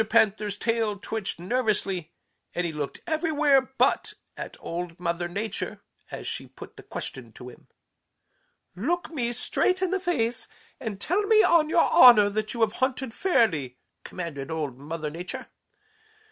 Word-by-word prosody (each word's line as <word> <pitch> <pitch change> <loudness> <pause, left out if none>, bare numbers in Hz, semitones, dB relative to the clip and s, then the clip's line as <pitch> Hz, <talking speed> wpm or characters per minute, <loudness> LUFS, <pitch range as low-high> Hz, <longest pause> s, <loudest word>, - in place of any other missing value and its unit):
Panther's 205 -1 +2
tail 225 -2 0
twitched 200 -3 -4
nervously, 195 -5 -1 0.4
and 175 - 0
he 165 - -3
looked 150 -2 -5
everywhere 310 -4 +3 0.2
but - - +2 0.2
at - - -7
Old 170 0 -5
Mother 175 0 -1
Nature 205 +5 -4 0.3
as - - -7
she - - -4
put - - -12
the - - -11
question 120 -4 -7
to 125 +2 -10
him. - - -17 1.1
"'Look 330 - -1
me 245 -7 -1
straight 365 +9 +1
in 375 -1 0
the 385 - +1
face 250 -11 -1 0.3
and 220 -7 -5
tell 360 - +1
me 435 0 +6
on 325 -3 +4
your 330 - +4
honor 215 -5 +8
that 215 +1 -2
you 235 - -3
have 220 -1 +3
hunted 260 -2 0
fairly,' 170 - +1 0.3
commanded 150 -7 -6
Old 150 -6 -3
Mother 155 +1 -5
Nature. 175 +3 -5
Mr. - - -15
215 Hz, 155 wpm, -26 LUFS, 170-265 Hz, 1.1 s, honor